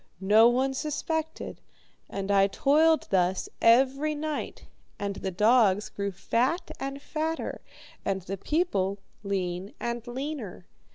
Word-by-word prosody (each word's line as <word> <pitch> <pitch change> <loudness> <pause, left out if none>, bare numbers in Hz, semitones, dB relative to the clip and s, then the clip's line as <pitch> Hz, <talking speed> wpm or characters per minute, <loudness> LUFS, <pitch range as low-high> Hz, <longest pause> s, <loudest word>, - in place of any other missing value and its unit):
No 215 +4 +6
one 260 +2 +1
suspected, 315 +2 -3 0.5
and 195 0 -3
I 195 -1 +5
toiled 310 +9 +3
thus 185 -1 +1
every 270 +6 +4
night, 305 0 -4 0.3
and 200 -1 -3
the 190 - -3
dogs 210 +1 +3
grew 200 0 -3
fat 240 - 0
and 275 +1 -4
fatter, 315 +3 -3 0.4
and 190 -2 -1
the 195 +2 -5
people 200 - 0 0.2
lean 190 -1 -3
and 235 0 -4
leaner. 250 - -5
235 Hz, 120 wpm, -28 LUFS, 195-295 Hz, 0.5 s, No